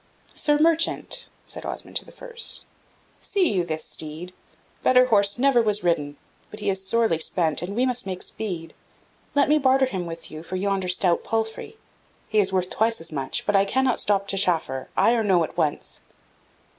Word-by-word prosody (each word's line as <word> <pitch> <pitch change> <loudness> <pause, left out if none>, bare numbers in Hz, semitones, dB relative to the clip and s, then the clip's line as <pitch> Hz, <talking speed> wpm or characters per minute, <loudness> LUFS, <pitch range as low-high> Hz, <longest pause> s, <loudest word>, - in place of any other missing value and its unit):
"Sir 295 -1 +1
merchant," 330 +1 +1 0.2
said - - -5
Osmond - - -5
to - - -6
the - - -14
first, 475 -2 -5 0.5
"see 370 - +1
you 180 -2 +1
this 160 -2 -4
steed? 160 +4 -5 0.5
Better 255 0 +5
horse 205 -4 +3
never 260 -1 +4
was 210 -2 0
ridden; 145 -4 0 0.3
but 210 - -9
he 205 - 0
is 190 0 -4
sorely 220 -4 +1
spent, 160 -1 +2
and 185 +3 -5
we 250 +3 +2
must 245 -4 0
make 185 -1 -4
speed. 175 -7 -5 0.6
Let 285 - +4
me 305 +1 +4
barter 265 -1 +4
him 185 -8 -4
with 165 0 -7
you 155 - -7
for 170 +3 -7
yonder 195 0 -1
stout 180 -1 +2
palfrey. 225 - -3 0.5
He 215 - +1
is 195 -2 +3
worth 185 -1 0
twice 225 +1 +1
as 165 0 -7
much, 135 -3 -2
but 205 - +1
I 195 - +5
cannot 260 +4 +1
stop 200 -1 0
to 195 - +1
chaffer 160 -8 0
ay 230 - +5
or 230 -2 +1
no 185 -5 +3
at 155 - -6
once." - - -2
200 Hz, 190 wpm, -24 LUFS, 175-240 Hz, 0.6 s, Better